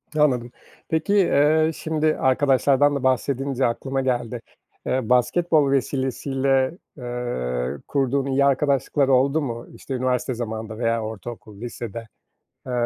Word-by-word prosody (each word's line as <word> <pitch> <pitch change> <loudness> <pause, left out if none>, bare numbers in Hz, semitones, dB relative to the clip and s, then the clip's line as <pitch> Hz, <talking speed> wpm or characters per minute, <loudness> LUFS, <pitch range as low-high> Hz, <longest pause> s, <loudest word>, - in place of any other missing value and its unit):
Anladım. 125 -5 +2 0.4
Peki, 160 +5 0
eee, 160 -4 +4
şimdi 155 -1 0
arkadaşlardan 140 +1 +3
da 135 - -3
bahsedince 135 +1 0
aklıma 135 +3 -1
geldi. 120 -2 -2 0.4
Eee, 130 -3 -1
basketbol 145 +4 +3
vesilesiyle, 135 +2 0 0.2
eee, 70 - -3
kurduğun 135 -1 0
iyi 140 +1 +2
arkadaşlıklar 140 0 +2
oldu 135 +4 +3
mu? 120 -4 -5
İşte 135 - -7
üniversite 130 0 0
zamanında 110 -2 -5
veya 115 -1 0
ortaokul, 110 -1 -8
lisede. 115 -1 -6 0.6
Eee, - - -4
130 Hz, 115 wpm, -23 LUFS, 120-140 Hz, 0.6 s, eee